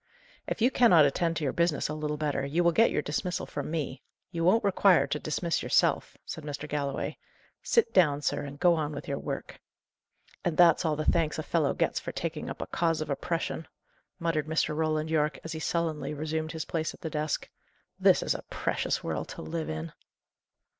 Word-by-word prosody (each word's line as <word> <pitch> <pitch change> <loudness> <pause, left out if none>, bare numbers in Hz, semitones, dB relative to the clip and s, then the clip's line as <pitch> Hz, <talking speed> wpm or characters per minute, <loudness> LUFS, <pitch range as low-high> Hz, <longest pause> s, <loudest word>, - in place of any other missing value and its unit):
"If 225 - -1
you 250 - +5
cannot 180 - +6
attend 165 +4 +1
to 155 - -3
your 135 - 0
business 170 -3 +1
a 150 - -3
little 150 0 -3
better, 145 -2 -1
you 155 +6 +1
will 170 - +5
get 225 +7 +5
your 150 - -1
dismissal 180 +5 -2
from 145 0 -5
me; 150 -4 -3 0.3
you 165 -2 -2
won't 195 +7 +4
require 195 -2 +4
to 150 - -2
dismiss 165 +3 -1
yourself," - - +2
said 160 - -6
Mr. 145 0 -5
Galloway. 140 -2 -3 0.4
"Sit 465 - +2
down, 150 -6 +4
sir, - - 0
and 140 0 -8
go 175 -1 +5
on 155 -2 -1
with 145 - -7
your 140 -1 -2
work." - - -5 0.8
"And 170 -3 -1
that's 175 0 +6
all 155 -2 +2
the 155 +1 -3
thanks 160 -2 +2
a 155 - -3
fellow 155 -4 +1
gets - - +1
for - - -6
taking - - -4
up - - -4
a - - -6
cause 165 -2 0
of 155 - -3
oppression!" 165 +2 -2 0.5
muttered 165 -4 -1
Mr. 155 -1 0
Roland 155 0 0
Yorke, 150 -1 +1
as 160 - -6
he 160 - -4
sullenly 160 -2 -1
resumed 155 +2 -3
his 160 -1 -4
place 160 -1 -2
at - - -22
the 160 -3 -4
desk. 150 0 -2 0.5
"This - - +5
is - - +1
a - - -5
precious - - -1
world - - -3
to - - -8
live 165 -1 -4
in!" 80 +1 -4
155 Hz, 205 wpm, -29 LUFS, 150-170 Hz, 0.8 s, cannot